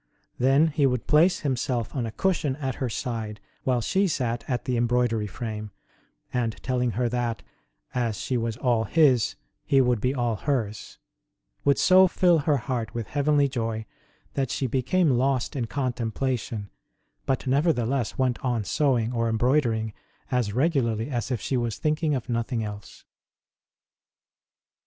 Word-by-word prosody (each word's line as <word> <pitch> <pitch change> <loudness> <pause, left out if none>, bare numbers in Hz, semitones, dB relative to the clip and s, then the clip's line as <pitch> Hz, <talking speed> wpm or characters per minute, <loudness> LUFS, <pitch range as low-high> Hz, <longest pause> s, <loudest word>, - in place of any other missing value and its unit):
Then 135 +5 +4
He 145 -2 +2
would 125 -3 -1
place 165 +5 +4
Him 140 -3 0
self 120 -1 -2
on 120 -4 -1
a - - -5
cushion 155 - 0
at 135 -3 -3
her 130 - 0
side 110 -2 -4 0.3
while 125 -2 +2
she 195 - +2
sat 120 -7 -1
at 125 -3 -2
the 125 - 0
embroidery 120 -2 +1
frame, 105 0 -5 0.6
and, 115 -3 -1
telling 125 -2 0
her 125 -1 +2
that, 120 -1 -2 0.5
as 115 -4 -1
she 130 - -2
was 115 -2 -1
all 120 -3 +1
His, 130 -3 +3 0.3
He 135 - +3
would 125 -4 +2
be 130 +2 0
all 120 -4 0
hers, 110 -5 -3 0.7
would 140 -1 +3
so 185 +1 +6
fill 175 -2 +3
her 145 0 +2
heart 120 -4 -3
with 115 -3 -4
heavenly 145 0 +2
joy 115 -4 -3 0.5
that 135 -3 -1
she 135 - -1
became 135 +7 +2
lost 130 +1 +1
in 120 -4 -2
contemplation, 120 -4 -2 0.6
but 130 - 0
nevertheless 135 -3 +1
went 130 -2 0
on 120 -4 0
sew 135 +6 +2
ing 115 +1 -1
or 115 -1 0
embroidering 115 -2 +1 0.4
as 125 -5 +1
regularly 125 -3 0
as 120 -3 -2
if 125 -4 -1
she 130 - -1
was 120 -3 -2
thinking 155 0 0
of 130 - -4
nothing 115 -1 -1
else. 105 -1 -8
125 Hz, 155 wpm, -26 LUFS, 115-140 Hz, 0.7 s, so